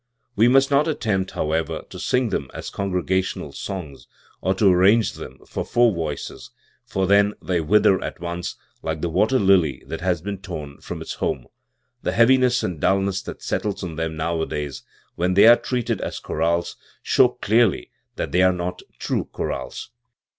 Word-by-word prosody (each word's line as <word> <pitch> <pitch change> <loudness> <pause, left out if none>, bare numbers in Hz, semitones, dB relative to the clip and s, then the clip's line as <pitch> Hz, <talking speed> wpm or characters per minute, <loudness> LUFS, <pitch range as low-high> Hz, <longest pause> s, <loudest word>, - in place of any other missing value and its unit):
We 110 +3 +5
must 135 +2 +4
not 145 +3 +4
attempt, 105 -11 -1
however, 80 +1 -2
to 90 - -8
sing 120 +6 +1
them 70 -9 -3
as - - -6
congregational 95 -1 -1
songs, 85 -9 -7 0.3
or 95 0 +1
to 105 - +1
arrange 95 +5 +4
them - - -9
for - - -4
four 120 -2 +3
voices, 80 -4 -5 0.4
for 95 0 0
then 100 +2 +4
they 90 -2 -1
wither 95 +3 +3
at - - -6
once, 85 0 -4 0.3
like 80 -1 -3
the 85 - -1
water 110 +10 +3
lily 90 - +3
that 80 0 -6
has 90 -2 +1
been 100 +3 -5
torn 80 -7 -7
from, - - -6
its - - -5
home, - - -2 0.6
The - - -1
heaviness 125 +1 +4
and 90 -4 -3
dull 95 0 +3
ness 95 0 -1
that - - -9
settle 105 -2 -1
on 85 -3 -5
them 80 -1 -3
nowadays 80 -4 -3 0.3
when 90 +1 0
they 100 - +7
arc 120 +1 +7
treated 125 -2 -1
as - - -4
chorales, 85 +2 -1 0.3
show 130 - +5
clearly 110 - +2 0.2
that - - -3
tl},ey 90 - +3
are - - +1
not 90 0 -4 0.2
true - - -2
chorales. - - -5
95 Hz, 175 wpm, -23 LUFS, 80-105 Hz, 0.6 s, they